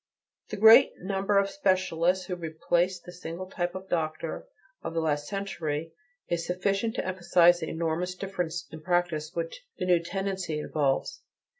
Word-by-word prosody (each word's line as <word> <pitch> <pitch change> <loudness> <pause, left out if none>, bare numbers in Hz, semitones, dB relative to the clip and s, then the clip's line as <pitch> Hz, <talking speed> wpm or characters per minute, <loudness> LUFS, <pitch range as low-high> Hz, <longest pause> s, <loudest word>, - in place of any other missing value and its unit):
The - - -4
great 225 +5 +8
number 195 +2 0
of 200 0 +4
specialists 185 - +1
who 180 - -3
replace 175 +2 0
the 175 +1 -11
single 175 0 -6
type 175 -1 -3
of 190 0 -7
doctor 160 - -3 0.3
of 165 - -5
the - - +2
last 150 -2 0
century, 165 -6 -3 0.3
is 170 -1 -1
sufficient 195 +6 -1
to - - -2
emphasize 175 -1 +4
the 160 - -4
enormous 165 +2 -2
difference 180 -4 -4
in 160 - -9
practise 170 -3 0
which - - -4
the - - -2
new 180 -1 +4
tendency 190 -2 -3
involves. 145 -3 -1
175 Hz, 155 wpm, -28 LUFS, 165-190 Hz, 0.3 s, great